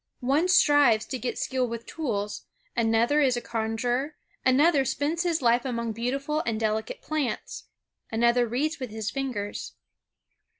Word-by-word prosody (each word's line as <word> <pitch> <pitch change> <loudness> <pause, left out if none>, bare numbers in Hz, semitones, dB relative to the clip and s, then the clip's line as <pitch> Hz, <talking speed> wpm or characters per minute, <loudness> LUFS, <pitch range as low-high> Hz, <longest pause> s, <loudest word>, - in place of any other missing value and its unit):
One 280 +7 +2
strives 290 -10 +5
to 260 - -5
get 245 - -3
skill 260 -1 -1
with 230 0 -6
tools, 210 -10 -4 0.3
another 235 +5 +3
is 255 -4 +3
a - - 0
conjurer, 240 +6 -2 0.3
another 280 +3 +4
spends 295 +6 -1
his 335 -5 0
life 235 +1 +4
among 235 -3 -2
beautiful 275 +7 -2
and 220 -2 -2
delicate 220 - -2
plants, 305 -5 -3 0.5
another 235 +2 +3
reads 295 +8 -1
with 255 -2 -4
his 220 0 -4
fingers. 245 -7 -4
250 Hz, 140 wpm, -27 LUFS, 230-290 Hz, 0.5 s, strives